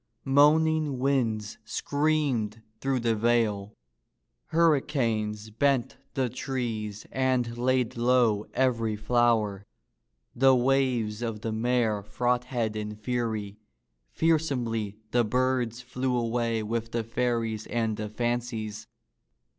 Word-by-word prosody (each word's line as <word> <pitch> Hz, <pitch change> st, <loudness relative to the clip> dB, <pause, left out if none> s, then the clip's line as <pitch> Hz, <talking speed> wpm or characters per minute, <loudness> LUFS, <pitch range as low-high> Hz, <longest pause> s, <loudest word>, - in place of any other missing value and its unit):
Moaning 150 Hz, +1 st, +4 dB
winds 120 Hz, -6 st, 0 dB
screamed 130 Hz, -4 st, 0 dB, 0.2 s
through 135 Hz, -1 st, 0 dB
the 115 Hz, -1 st, +2 dB
vale. 110 Hz, -2 st, +1 dB, 0.7 s
Hurricanes 115 Hz, -10 st, +1 dB
bent 130 Hz, +2 st, +1 dB, 0.2 s
the 130 Hz, -2 st, +1 dB
trees 115 Hz, -5 st, -4 dB
and 130 Hz, -3 st, 0 dB
laid 125 Hz, 0 st, +1 dB
low 120 Hz, -3 st, +2 dB
every 115 Hz, -4 st, +1 dB
flower. 110 Hz, -3 st, +1 dB, 0.7 s
The 130 Hz, +1 st, +5 dB
waves 125 Hz, -4 st, +1 dB
of 115 Hz, -3 st, -3 dB
the 115 Hz, -, -2 dB
mere 110 Hz, -2 st, +1 dB
frothed 120 Hz, +1 st, -1 dB
in 105 Hz, 0 st, -4 dB
fury. 110 Hz, -3 st, -3 dB, 0.5 s
Fearsomely 125 Hz, -10 st, 0 dB
the 120 Hz, -1 st, +3 dB
birds 125 Hz, 0 st, 0 dB
flew 125 Hz, 0 st, -2 dB
away 115 Hz, -1 st, 0 dB
with 115 Hz, +1 st, -3 dB
the 115 Hz, -1 st, 0 dB
fairies 115 Hz, -2 st, -1 dB
and 115 Hz, -2 st, -1 dB
the 105 Hz, 0 st, -5 dB
fancies. 115 Hz, -2 st, -3 dB
120 Hz, 105 wpm, -27 LUFS, 110-130 Hz, 0.7 s, The